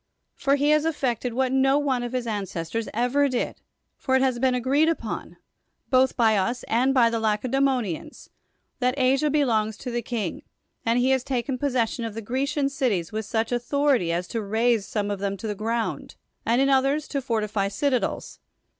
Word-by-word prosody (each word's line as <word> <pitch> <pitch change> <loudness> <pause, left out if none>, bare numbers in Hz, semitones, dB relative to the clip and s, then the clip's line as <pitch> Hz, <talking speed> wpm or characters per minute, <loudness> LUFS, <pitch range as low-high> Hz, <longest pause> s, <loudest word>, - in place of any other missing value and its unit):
For 275 0 +1
he 290 +1 +2
has 305 0 +4
effected 250 -7 -1
what 260 0 +1
no 270 +1 +3
one 275 -4 0
of 240 0 -5
his 250 -2 -1
ancestors 200 -1 -3
ever 250 +5 +2
did; 250 -2 -3 0.4
for 260 - +1
it 265 - +3
has 255 -2 +1
been 260 0 +2
agreed 275 +6 +2
on, - - -6 0.5
both 260 0 +3
by 225 -2 +4
us 235 +6 -1
and 250 +4 +2
by 240 -4 +4
the 230 - -1
Lacedaemonians, 250 - -1 0.5
that 250 +1 +1
Asia 270 +3 +3
belongs 225 -8 +1
to 250 - -6
the 240 0 -1
king, 225 -6 -3 0.4
and 230 +1 +2
he 250 +2 +3
has 265 -2 +2
taken 255 0 -2
possession 245 -4 0
of 225 -2 -5
the 225 - -4
Grecian 275 +5 0
cities 240 - -1
with 215 -1 -4
such 225 +1 -1
authority 245 - +1
as 175 +2 -2
to 230 - -2
raze 220 +1 +1
some 205 -1 -2
of 200 - -3
them 200 0 -2
to 225 - -8
the 210 - -1
ground, 225 +3 -3 0.3
and 235 +2 +3
in 275 - +3
others 275 +3 +2
to 280 - -2
fortify 215 -5 -1
citadels. 250 +6 -1
245 Hz, 185 wpm, -25 LUFS, 220-270 Hz, 0.5 s, has